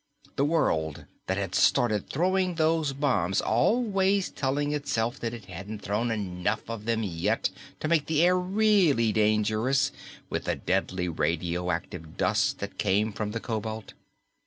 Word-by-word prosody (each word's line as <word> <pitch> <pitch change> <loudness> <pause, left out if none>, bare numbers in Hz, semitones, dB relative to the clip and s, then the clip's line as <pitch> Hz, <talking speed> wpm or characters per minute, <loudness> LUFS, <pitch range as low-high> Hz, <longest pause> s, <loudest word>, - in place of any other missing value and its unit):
The 140 - +2
world 80 - 0 0.2
that 95 - 0
had 100 -2 -3
started 110 -2 +2
throwing 185 +3 +1
those 160 -2 +2
bombs, 125 - +1
always 195 - +2
telling 145 +2 -1
itself 135 -4 -1
that 115 - -2
it 115 -4 -9
hadn't 100 +4 -8
thrown 105 +5 -1
enough 100 -1 -2
of 115 -2 -6
them 115 -1 0
yet 85 -5 0 0.3
to - - -1
make 160 -2 +2
the 160 0 +3
air 180 +1 +5
really 185 - +3
dangerous 110 +5 +2 0.4
with - - -3
the - - 0
deadly 95 -1 -1
radioactive 85 +1 -2
dust - - +1
that 100 -1 -7
came 105 +2 +1
from 105 +1 -3
the 115 +2 -3
cobalt. 110 -1 -4
110 Hz, 145 wpm, -27 LUFS, 95-150 Hz, 0.4 s, air